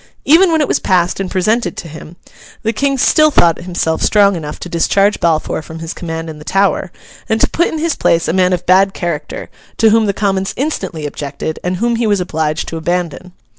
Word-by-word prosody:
Even 335 +5 +5
when 320 -1 +2
it 295 - +1
was - - +1
passed 180 -1 +1
and 195 -1 -3
presented 215 +6 0
to 170 - -6
him, 160 +2 -11 0.5
the 225 +1 0
King 275 +3 0
still 310 +4 +4
thought 170 - +3
himself 170 -2 -2
strong 200 -2 +4
enough 150 -3 -6
to - - -7
discharge 195 +4 +1
Balfour 160 -2 0
from 160 +1 -10
his 165 0 -6
command 165 -1 -5
in 155 -1 -8
the - - -11
Tower, 195 0 0 0.4
and 220 0 +1
to - - +3
put 340 - +1
in 320 - -4
his 325 0 0
place 165 -9 +1
a - - 0
man 185 0 +3
of 180 -1 -1
bad 195 +2 +4
character; 170 -4 -4 0.3
to 220 -1 +4
whom 220 -1 +3
the - - +2
Commons 195 0 -1
instantly 245 - -3
objected, 145 +1 -5
and 180 +1 -1
whom 235 +4 0
he 230 -1 0
was 205 -2 +2
obliged 160 -3 -2
to 165 - -5
abandon. 175 +1 -3
180 Hz, 215 wpm, -15 LUFS, 165-220 Hz, 0.5 s, Even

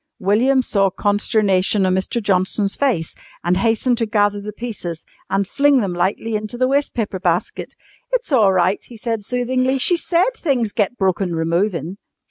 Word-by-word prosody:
William 245 +7 +2
saw 195 -4 +1
consternation 205 -1 +1
on 185 - +2
Mr. 190 +6 -1
Johnson's 195 +1 0
face 235 - -1 0.3
and 175 +1 +2
hastened 230 +3 +1
to 230 - 0
gather 205 -2 +1
the 210 +1 -6
pieces 205 -7 -6 0.2
and 195 0 0
fling 280 +3 +3
them 195 -6 -2
lightly 190 +5 -1
into 215 +3 -4
the 255 +1 +2
waste 280 +2 0
paper 205 -5 -2
basket. 175 -1 -2 0.4
"It's - - -2
all 220 -8 +4
right," 185 +1 +1
he 235 - -12
said 225 -1 -3
soothingly. 255 +3 0
"She 350 +7 +4
said 350 +6 +1
things 250 - 0
get 210 +4 -1
broken 190 -2 0
removin'." 170 +2 -1
210 Hz, 165 wpm, -19 LUFS, 190-245 Hz, 0.4 s, all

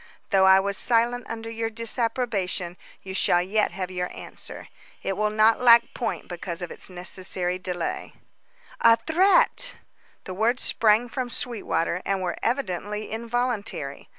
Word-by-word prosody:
Though 190 -2 +5
I 190 0 +8
was 200 0 -1
silent 240 0 +1
under 225 0 -5
your 225 0 -2
disapprobation, 225 -6 -2 0.3
you 190 - -7
shall 175 -2 +3
yet 200 +4 +1
have 185 0 -4
your 180 -1 -2
answer. - - -9 0.4
It 195 - -1
will 210 +2 +1
not 215 +1 +4
lack 235 -1 +6
point 230 - -3
because 175 0 -6
of 175 - -6
its - - -9
necessary 180 0 -3
delay." 180 -2 -4 0.7
"A 230 - +6
threat!" 375 - +3 0.5
The 185 - -6
words 225 +6 +1
sprang 220 +2 +3
from 250 +1 -4
Sweetwater, 210 -8 -1
and 195 -1 -1
were 180 - -2
evidently 210 -4 -2
involuntary. 225 - -3
215 Hz, 145 wpm, -25 LUFS, 185-235 Hz, 0.7 s, I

